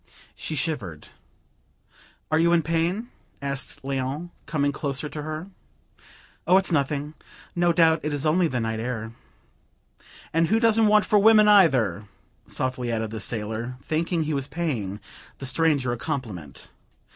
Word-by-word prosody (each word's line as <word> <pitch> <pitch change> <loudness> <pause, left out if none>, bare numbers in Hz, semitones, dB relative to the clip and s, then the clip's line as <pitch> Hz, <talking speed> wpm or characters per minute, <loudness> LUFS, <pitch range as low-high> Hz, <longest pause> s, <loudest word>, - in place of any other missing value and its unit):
She 155 - -4
shivered. 110 - -3 1.3
"You 170 +2 +4
are - - +6
in 165 - +2
pain?" 170 +9 -1 0.3
asked 140 -1 -4
Léon, 135 +5 -3 0.2
coming 145 -3 +1
closer 140 0 -3
to 150 0 -6
her. 155 +5 -6 1.0
"Oh, 180 +2 +6
it's 195 -1 +1
nothing! 145 0 0 0.4
No 175 0 +3
doubt, 165 -1 +4
it 150 - -2
is 145 +1 -1
only 170 +3 +3
the 130 -5 -2
night 110 -1 -2
air." 115 -1 -4 1.2
"And 165 +1 +3
who 220 +5 +3
doesn't 225 -1 +4
want 210 0 +5
for 210 -2 +4
women, 215 0 +6
either," 130 - +4 0.4
softly 130 -2 -2
added 110 -1 -2
the 110 - -5
sailor, 110 +3 -4
thinking 165 +1 0
he 155 0 -2
was 140 -1 -2
paying 120 - -3 0.4
the 135 - -7
stranger 140 -2 +1
a - - -4
compliment. 110 - -6
150 Hz, 145 wpm, -25 LUFS, 125-170 Hz, 1.3 s, are